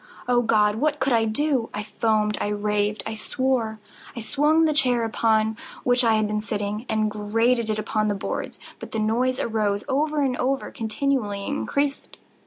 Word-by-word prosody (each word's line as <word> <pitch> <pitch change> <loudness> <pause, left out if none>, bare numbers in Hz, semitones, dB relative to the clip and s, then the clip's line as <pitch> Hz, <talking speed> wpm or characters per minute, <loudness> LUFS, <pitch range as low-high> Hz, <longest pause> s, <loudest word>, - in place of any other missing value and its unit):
Oh 245 -1 +3
God! 210 -2 +3
what 295 +3 +1
could 260 0 +1
I 225 -1 +3
do? 250 +1 0
I 210 - -3
foamed—I 215 -1 0
raved—I 210 +1 -1
swore! 230 -1 -1 0.4
I - - -5
swung 300 +8 +2
the 310 - +2
chair 250 -5 +2
upon 220 -1 +1 0.3
which 245 0 +3
I 225 -2 +4
had 215 0 +2
been 210 0 -1
sitting, 210 +2 -3
and 215 -1 +1
grated 225 +3 +1
it 215 - 0
upon 215 0 -1
the 205 - 0
boards, 195 - -4 0.2
but - - -9
the - - -1
noise 240 +4 +1
arose 210 -2 0
over 295 +1 +1
all 255 +1 +1
and - - -8
continually 220 -4 -1
increased. 285 0 -2
225 Hz, 170 wpm, -24 LUFS, 215-255 Hz, 0.4 s, I